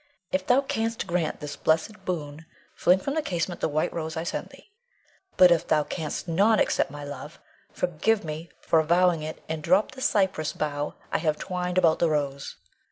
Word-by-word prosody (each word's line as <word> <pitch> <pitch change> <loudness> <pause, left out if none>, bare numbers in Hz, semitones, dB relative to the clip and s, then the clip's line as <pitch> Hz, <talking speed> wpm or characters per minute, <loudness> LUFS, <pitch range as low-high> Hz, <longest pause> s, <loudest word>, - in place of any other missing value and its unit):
If 185 0 -1
thou 250 +2 +5
canst 225 -4 -2
grant 170 -2 -1
this 150 -1 -5
blessed 190 +6 0
boon, 160 -2 -4 0.3
fling 180 - +4
from 275 +9 -3
the 315 - +1
casement 175 - -3
the - - +1
white 155 +1 0
rose 160 -1 -4
I 160 - -2
send 170 - -4
thee; - - -18 0.7
but 180 -1 +8
if 170 - +2
thou 150 -1 +3
canst 160 +2 -4
not 200 +6 +3
accept - - +2
my 145 +1 -8
love, 145 +2 -8 0.3
forgive 180 +5 0
me 160 +2 -6
for 165 - +3
avowing 170 +1 +3
it, 155 +1 -6
and 160 -1 -3
drop 185 +9 +3
the 260 0 -10
cypress 190 - +1
bough 145 -1 -3 0.2
I - - +1
have 155 -2 0
twined 180 0 -3
about 165 -3 +4
the 170 - +3
rose. 140 -2 -2
165 Hz, 190 wpm, -26 LUFS, 155-185 Hz, 0.7 s, but